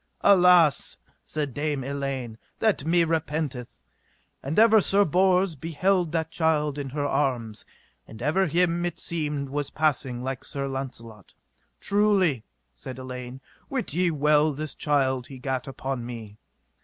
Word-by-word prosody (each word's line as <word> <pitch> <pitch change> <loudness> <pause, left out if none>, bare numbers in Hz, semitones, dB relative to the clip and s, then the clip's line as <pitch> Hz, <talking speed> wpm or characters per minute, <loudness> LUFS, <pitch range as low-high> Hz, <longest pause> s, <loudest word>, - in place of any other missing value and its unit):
Alas, 180 -6 +5 0.3
said 145 -4 -3
Dame 145 -1 -2
Elaine, 135 -4 -4 0.2
that 210 -10 +1
me 170 +1 +3
repenteth. 155 -6 -3 0.6
And 140 +4 -4
ever 220 -1 +7
Sir 200 +2 +3
Bors 185 +1 +2
beheld 170 +3 0
that 160 -1 -2
child 150 -3 +1
in 140 -1 -4
her 145 +2 -2
arms, 120 -7 -1 0.4
and 110 - -11
ever 155 +9 +1
him 175 +1 +1
seemed 150 -5 -3
it - - -12
was 145 0 -2
passing 135 -5 0
like 130 0 -4
Sir 140 -1 -4
Launcelot. 120 -6 -7 0.4
Truly, 200 - +2 0.3
said 120 - -9
Elaine, 125 0 -7 0.3
wit 260 - -3
ye 180 +2 +2
well 150 0 +3
this 155 +2 -5
child 130 -4 0
he 135 - -10
gat 130 0 -3
upon 135 -2 -4
me. 115 -3 -8
145 Hz, 140 wpm, -26 LUFS, 130-170 Hz, 0.6 s, ever